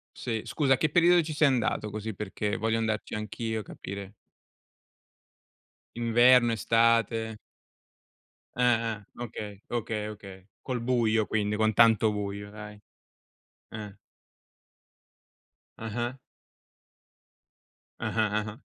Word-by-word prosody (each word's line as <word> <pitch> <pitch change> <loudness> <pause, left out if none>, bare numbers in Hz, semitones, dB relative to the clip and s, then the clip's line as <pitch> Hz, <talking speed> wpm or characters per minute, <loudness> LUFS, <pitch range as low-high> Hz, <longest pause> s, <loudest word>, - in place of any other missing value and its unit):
Sì, 110 -2 -3
scusa, 135 -4 +2
che 155 - +1
periodo 175 +2 +5
ci 160 -1 -5
sei 150 0 +4
andato 120 -4 0
così 110 0 -5
perché 105 +1 -3
voglio 110 +1 0
andarci 110 -1 -2
anch'io 110 +1 -3
e - - -6
capire. 100 0 -8 1.8
Inverno, 120 +1 +5
estate? 115 0 +2 1.2
Ah-ah. 115 -3 +1 0.2
Okay, 105 -4 -6
okay, 110 -3 -2
okay, 100 -3 -11
col 125 -2 -3
buio, 115 -3 +2
quindi 105 -1 0
con 110 +1 +2
tanto 110 -1 +5
buio, 100 0 -4
dai. 105 0 -10 0.9
Eh. 105 -2 -8 1.8
Ah-ah. 120 +3 -3 1.8
Ah-ah, 110 -1 0 0.2
ah-ah. 105 +1 -7
110 Hz, 100 wpm, -28 LUFS, 105-120 Hz, 1.8 s, periodo